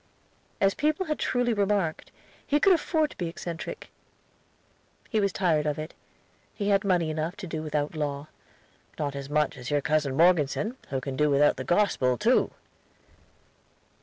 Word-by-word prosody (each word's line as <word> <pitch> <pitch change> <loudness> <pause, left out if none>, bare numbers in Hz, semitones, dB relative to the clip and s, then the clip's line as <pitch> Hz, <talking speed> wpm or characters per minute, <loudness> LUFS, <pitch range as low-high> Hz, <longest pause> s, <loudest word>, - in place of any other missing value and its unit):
As 195 0 +3
people 310 +5 0
had 305 -2 -2
truly 245 -1 +1
remarked, 200 -5 0 0.4
he 290 - +3
could 390 +4 +6
afford 315 -2 +1
to - - -14
be 175 - -2
eccentric. 165 0 -7 1.2
He 220 - +2
was 200 -1 +1
tired 160 -6 +1
of 150 - -1
it; 155 +1 -6 0.6
he 205 -1 -1
had 200 -1 +3
money 175 -5 +1
enough 160 +3 -3
to 205 -3 -7
do 160 -3 -4
without 150 -1 -2
law. 145 -2 -3 0.7
"Not 145 -2 -2
as 140 0 -6
much 150 -2 +1
as 125 -1 -7
your 145 0 +1
cousin 145 -2 0
Morgeson, 175 - +3
who 135 -1 -2
can 135 0 -4
do 150 +2 +2
without 145 +1 +4
the 130 - -4
Gospel, 130 -9 +2
too." 240 +4 +3
165 Hz, 165 wpm, -27 LUFS, 145-205 Hz, 1.2 s, could